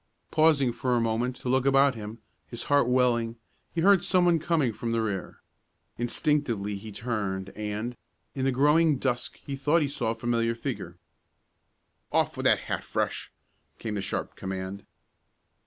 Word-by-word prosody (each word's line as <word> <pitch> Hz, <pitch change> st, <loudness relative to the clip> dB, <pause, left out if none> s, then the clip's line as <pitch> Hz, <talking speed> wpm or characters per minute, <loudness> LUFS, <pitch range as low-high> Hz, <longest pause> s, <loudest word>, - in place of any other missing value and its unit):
Pausing 150 Hz, -6 st, +4 dB
for 125 Hz, 0 st, 0 dB
a -, -, +3 dB
moment 115 Hz, +2 st, 0 dB
to -, -, -6 dB
look 130 Hz, +1 st, +2 dB
about 135 Hz, 0 st, +5 dB
him, 110 Hz, -1 st, -7 dB, 0.3 s
his 120 Hz, -, -6 dB
heart 145 Hz, -3 st, +3 dB
welling, 120 Hz, -2 st, +2 dB, 0.4 s
he 165 Hz, -, -1 dB
heard 195 Hz, 0 st, +5 dB
someone 175 Hz, -3 st, +3 dB
coming 155 Hz, -7 st, +1 dB
from 115 Hz, +2 st, -3 dB
the 115 Hz, -, +1 dB
rear. 100 Hz, -4 st, -4 dB, 0.5 s
Instinctively 120 Hz, -4 st, 0 dB
he 105 Hz, +2 st, -8 dB
turned, 100 Hz, -4 st, -3 dB
and 105 Hz, +3 st, -3 dB, 0.4 s
in 135 Hz, -1 st, -2 dB
the 135 Hz, -, +3 dB
growing 150 Hz, +3 st, +4 dB
dusk 125 Hz, -2 st, -2 dB
he 140 Hz, -, -3 dB
thought 150 Hz, +4 st, +2 dB
he -, -, 0 dB
saw 135 Hz, -5 st, -2 dB
a 115 Hz, -, -1 dB
familiar 115 Hz, 0 st, 0 dB
figure. 115 Hz, -, -5 dB, 1.1 s
"Off -, -, +1 dB
with -, -, -4 dB
that -, -, +4 dB
hat, -, -, -3 dB
Fresh.!" -, -, -2 dB, 0.5 s
came 110 Hz, -, -4 dB
the 100 Hz, -, -2 dB
sharp 95 Hz, -, -3 dB
command. 95 Hz, +1 st, -5 dB
120 Hz, 160 wpm, -27 LUFS, 110-140 Hz, 1.1 s, about